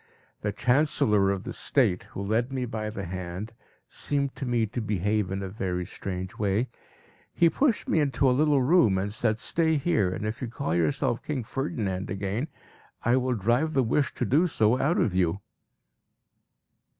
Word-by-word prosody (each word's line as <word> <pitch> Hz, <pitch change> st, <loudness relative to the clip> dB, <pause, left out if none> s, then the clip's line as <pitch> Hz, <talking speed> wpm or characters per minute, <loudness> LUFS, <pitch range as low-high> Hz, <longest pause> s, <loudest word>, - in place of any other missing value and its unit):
The 105 Hz, -, -1 dB
Chancellor 125 Hz, -3 st, +2 dB
of 100 Hz, -1 st, -1 dB
the 120 Hz, -1 st, -5 dB
State, 110 Hz, -11 st, +1 dB
who 100 Hz, -, -7 dB
led 115 Hz, +5 st, 0 dB
me 130 Hz, -2 st, -2 dB
by 110 Hz, -2 st, -4 dB
the 105 Hz, -3 st, -5 dB
hand, 95 Hz, +4 st, -5 dB, 0.3 s
seemed 140 Hz, -, -2 dB
to 135 Hz, -, -4 dB
me 120 Hz, -2 st, +2 dB
to 115 Hz, +3 st, -4 dB
behave 105 Hz, -1 st, 0 dB
in 95 Hz, +1 st, -3 dB
a -, -, -3 dB
very 90 Hz, -2 st, -3 dB
strange 95 Hz, +1 st, -6 dB
way; 105 Hz, +4 st, +1 dB, 0.6 s
he 170 Hz, -1 st, +3 dB
pushed 260 Hz, -, +1 dB
me 160 Hz, -, +2 dB
into 140 Hz, -2 st, +2 dB
a -, -, +5 dB
little 145 Hz, 0 st, +3 dB
room 125 Hz, -, +4 dB
and 100 Hz, +2 st, -2 dB
said, 110 Hz, -1 st, +1 dB
"Stay 160 Hz, +6 st, +1 dB
here, 135 Hz, -, +1 dB
and 90 Hz, -, -4 dB
if 110 Hz, +2 st, -4 dB
you 125 Hz, -, -2 dB
call 95 Hz, -8 st, -3 dB
yourself 125 Hz, -, +1 dB
'King 140 Hz, -5 st, -3 dB
Ferdinand' 105 Hz, -7 st, -3 dB
again, 100 Hz, +8 st, -2 dB, 0.6 s
I 120 Hz, +2 st, +4 dB
will 130 Hz, -1 st, 0 dB
drive 120 Hz, +10 st, +1 dB
the 135 Hz, -, +4 dB
wish 130 Hz, +4 st, +1 dB
to -, -, -1 dB
do 160 Hz, +7 st, +3 dB
so 115 Hz, -5 st, +2 dB
out 155 Hz, +6 st, +2 dB
of 100 Hz, -, +1 dB
you." 90 Hz, 0 st, +1 dB
115 Hz, 180 wpm, -27 LUFS, 100-135 Hz, 0.6 s, a